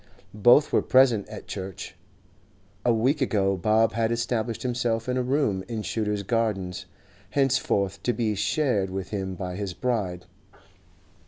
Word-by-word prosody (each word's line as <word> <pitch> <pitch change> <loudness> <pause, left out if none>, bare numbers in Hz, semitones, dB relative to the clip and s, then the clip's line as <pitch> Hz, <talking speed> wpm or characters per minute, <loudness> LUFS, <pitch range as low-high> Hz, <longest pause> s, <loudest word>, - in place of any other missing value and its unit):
Both 120 +8 +5
were - - +4
present 125 -6 +3
at - - -9
church. 95 -1 -7 0.9
A 120 - +3
week 130 +6 +1
ago 100 -6 +1
Bob 110 +4 +2
had 115 0 0
established 115 -1 -2
himself 120 -2 -1
in 125 - 0
a 130 - +1
room 125 -7 0
in 115 -3 -4
Shooter's 105 +1 -2
Gardens, 100 -4 -1 0.4
henceforth 100 -7 +1
to 120 - +1
be 110 -2 -1
shared 105 -2 0
with 95 0 -5
him 95 -2 -3
by 90 0 -5
his 100 -3 -4
bride. 95 -7 -2
110 Hz, 145 wpm, -26 LUFS, 95-120 Hz, 0.9 s, Both